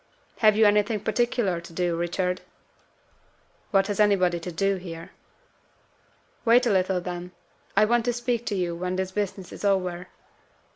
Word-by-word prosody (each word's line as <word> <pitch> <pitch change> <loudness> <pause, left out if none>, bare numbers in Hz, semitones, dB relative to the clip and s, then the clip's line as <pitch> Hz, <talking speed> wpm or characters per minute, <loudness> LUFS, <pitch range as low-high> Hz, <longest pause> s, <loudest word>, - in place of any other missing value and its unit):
"Have 215 -1 +5
you 220 - +6
anything 210 +1 +2
particular 220 -5 0
to 170 0 -13
do, 175 0 0
Richard?" 180 +2 -1 1.3
"What 195 -2 +3
has 205 0 -3
anybody 185 -4 +3
to 175 +2 -6
do 195 +4 0
here?" 165 -3 -9 1.3
"Wait 240 +1 +5
a 235 - +2
little, 185 -1 +2
then. 180 0 -6 0.4
I 215 - +6
want 235 +1 +2
to 245 - +1
speak 240 -1 -1
to 205 - -1
you 175 -2 -1
when 180 +1 -3
this 190 0 -2
business 190 -2 -4
is - - -10
over." 180 -3 0
190 Hz, 155 wpm, -25 LUFS, 180-215 Hz, 1.3 s, you